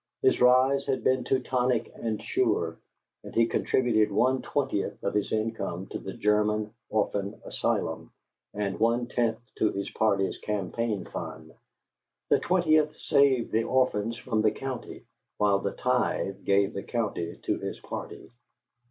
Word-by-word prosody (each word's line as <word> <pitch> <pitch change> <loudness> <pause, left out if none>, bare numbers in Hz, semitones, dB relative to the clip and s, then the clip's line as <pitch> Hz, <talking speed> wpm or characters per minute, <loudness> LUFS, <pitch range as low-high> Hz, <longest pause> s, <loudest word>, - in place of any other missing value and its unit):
His - - +3
rise 130 +2 +5
had 135 - 0
been 130 -1 +2
Teutonic 125 -2 0
and 110 -2 -3
sure; 80 -1 0 0.4
and - - -10
he 115 - +5
contributed 115 -3 +2
one 130 +6 +2
twentieth 135 -8 -1
of 100 - -1
his 105 -1 0
income 110 -5 -2
to - - -4
the 95 - -7
German 105 +1 +1 0.2
Orphan 100 -2 -1
Asylum - - -2 0.4
and 100 -2 -3
one 115 +2 +2
tenth 115 -2 0 0.2
to 110 - +3
his 100 0 -4
party's 100 -3 +1
campaign 105 +1 -2
fund. - - -7 0.8
The - - +5
twentieth 155 -4 +2
saved 135 -4 +3
the 115 +1 +1
orphans 115 -4 +1
from 110 -4 -1
the 110 - +4
county, 130 +1 -6 0.3
while 100 -1 +3
the 100 - -2
tithe 125 -6 -1
gave 100 0 +3
the 100 - -4
county 105 -8 -3
to - - 0
his - - -5
party. - - -7
110 Hz, 145 wpm, -28 LUFS, 100-125 Hz, 0.8 s, rise